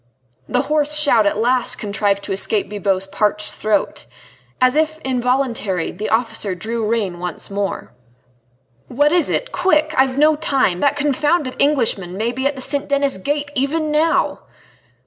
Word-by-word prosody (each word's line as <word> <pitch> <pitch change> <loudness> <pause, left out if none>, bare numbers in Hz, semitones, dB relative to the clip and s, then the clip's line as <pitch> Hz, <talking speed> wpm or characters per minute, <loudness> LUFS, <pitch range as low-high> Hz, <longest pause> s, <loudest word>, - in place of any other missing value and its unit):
The 250 - +1
hoarse 300 0 +1
shout 240 -8 +4
at 200 - 0
last 245 +3 +1
contrived 200 -1 -1
to 200 - -6
escape 200 +2 0
Bibot's 195 -2 -1
parched 210 +1 -1
throat. 215 0 -1 0.5
As 255 +1 +3
if 315 0 +1
involuntarily, 250 -8 -1
the 210 +4 -5
officer 220 -4 0
drew 225 +4 -4
rein 205 -6 -1
once 180 +2 -5
more. 200 0 -3 1.0
"What 290 +4 +2
is 345 -3 +3
it? - - -2
Quick! 310 -4 +1
I've 265 0 +2
no 305 +1 +4
time. 270 - 0
That 285 +7 +2
confounded 295 0 0
Englishman 225 -11 +1
may 225 +3 -1
be 260 +2 -1
at 285 - -2
the 260 - -2
St. 280 +1 +1
Denis 280 -6 +1
Gate 290 +6 -2
even 300 +3 -1
now!" 315 +2 +1
255 Hz, 155 wpm, -19 LUFS, 205-290 Hz, 1.0 s, shout